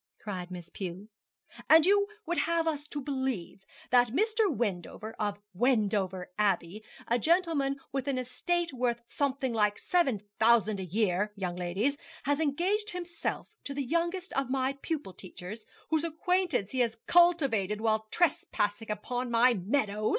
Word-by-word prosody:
cried 185 -4 -6
Miss 175 -2 -8
Pew. 190 +2 -6 0.6
'And 320 0 +8
you 405 +1 +4 0.2
would 345 +1 0
wish - - +1
us 325 -3 0
to 295 - -5
believe 260 - -3 0.3
that 245 -1 +6
Mr. 425 - +2
Wendover, 215 - -3
of 205 -1 -1 0.2
Wendover 200 -5 +1
Abbey 200 0 0 0.2
a 235 +1 +2
gentleman 315 - +2
with 270 0 -2
an 275 -2 0
estate 335 +7 -1
worth 240 -2 -1
something 270 -2 -1
like 210 -2 +2
seven 340 -11 +2 0.2
thousand 220 -2 +4
a - - -3
year, 200 +1 +1
young 180 -3 -3
ladies 190 +11 -1 0.2
has 285 +1 +1
engaged 360 +8 +1
himself 350 -2 -4 0.2
to 280 - -5
the 280 -1 -2
youngest 340 +5 -1
of 270 -2 -1
my 265 0 +1
pupil 295 - -3
teachers, 185 +4 -9 0.2
whose 315 -1 +2
acquaintance 335 - 0
he 260 - -2
has 230 -2 +1
cultivated 275 - +4
while 220 -1 +1
trespassing 225 -10 0 0.2
on 250 0 -2
my 240 +2 +5
meadow? 210 +1 0
250 Hz, 150 wpm, -30 LUFS, 210-315 Hz, 0.6 s, And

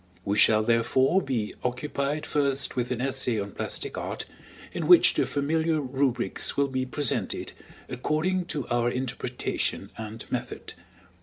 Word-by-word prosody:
We 100 - +1
shall, 110 0 +5
therefore, 120 - +3
be 120 - -2
occupied 140 +3 -2
first 140 -2 0
with 125 -1 -1
an 125 -1 -2
essay 130 -4 0
on 100 0 -4
plastic - - -4
art, - - -4 0.5
in - - -2
which - - +8
the - - +1
familiar 160 +3 +1
rubrics 130 -3 -1
will 140 0 +3
be 130 0 -1
presented 145 -1 -2 0.4
according 155 +8 0
to 150 -6 -4
our 120 0 +2
interpretation 125 0 -2
and 110 +1 -6
method. - - -4
130 Hz, 140 wpm, -27 LUFS, 120-145 Hz, 0.5 s, which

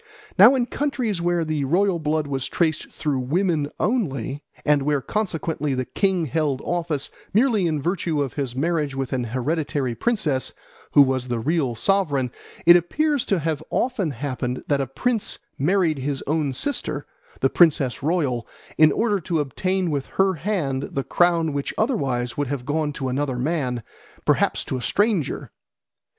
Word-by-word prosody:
Now 215 +8 +8
in 250 -2 +1
countries 245 -9 -2
where 175 -1 +1
the 155 -2 -1
royal 180 +4 +2
blood 155 0 0
was 135 -2 -2
traced 160 -3 0
through 145 -4 -1
women 155 +2 0
only, 145 - -1 0.2
and 150 -1 +4
where 145 +1 +1
consequently 160 -5 -2
the 130 0 -1
king 190 0 0
held 150 -2 0
office 165 -5 -2 0.2
merely 220 -6 +3
in 155 -2 0
virtue 165 0 -1
of 140 -3 -1
his 135 -4 -3
marriage 150 -1 0
with 135 -1 -3
an 125 -2 -1
hereditary 135 +1 -1
princess, 155 - -1 0.4
who 145 - +9
was 130 -2 -1
the 120 -1 -1
real 135 0 0
sovereign, 145 - +1 0.3
it 170 +1 +9
appears 290 - +1
to 195 - +2
have 160 -2 -1
often 240 -9 0
happened 130 -1 -3
that 140 -2 +2
a 135 - -2
prince 225 - -1 0.2
married 165 0 +2
his 135 +1 -3
own 150 -1 0
sister, 280 - -2 0.4
the - - +4
princess 145 -7 +3
royal, 140 -6 0 0.3
in 155 -1 +7
order 210 +3 +1
to 170 -1 -1
obtain 180 +6 -1
with 140 -2 -2
her 195 0 +4
hand 160 -6 -1
the 140 -1 -3
crown 170 -2 +2
which 140 -1 -3
otherwise 135 - 0
would 145 -1 -1
have 130 -2 -4
gone 150 +1 0
to 135 -2 -4
another 130 0 -1
man, 125 -4 -1 0.4
perhaps - - +2
to 130 - -2
a - - -5
stranger. 205 - 0
150 Hz, 165 wpm, -23 LUFS, 135-180 Hz, 0.4 s, who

